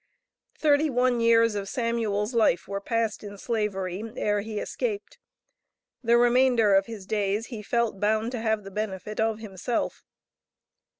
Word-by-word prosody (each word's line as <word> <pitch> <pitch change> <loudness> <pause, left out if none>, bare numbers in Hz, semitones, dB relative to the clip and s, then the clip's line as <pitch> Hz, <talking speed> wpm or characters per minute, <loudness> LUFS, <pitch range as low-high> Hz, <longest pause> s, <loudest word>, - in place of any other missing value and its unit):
Thirty 300 0 +3
one 250 -1 +2
years 230 -1 +4
of 200 -1 -4
Samuel's 230 -2 -1
life 220 -7 +2
were 200 +1 -4
passed 230 -1 -1
in 205 -1 -8
Slavery, 195 -4 -2
ere 205 0 0
he 215 0 -6
escaped. 455 - -4 0.8
The 235 0 +4
remainder 240 -3 +4
of 195 0 +4
his 220 -4 -8
days 205 +1 -1
he 220 - -5
felt 235 -1 -1
bound 215 +3 +1
to 245 -3 -4
have 220 -2 0
the 195 - -9
benefit 210 0 -4
of 220 -1 +1
himself. 215 +2 -3
220 Hz, 145 wpm, -26 LUFS, 205-235 Hz, 0.8 s, years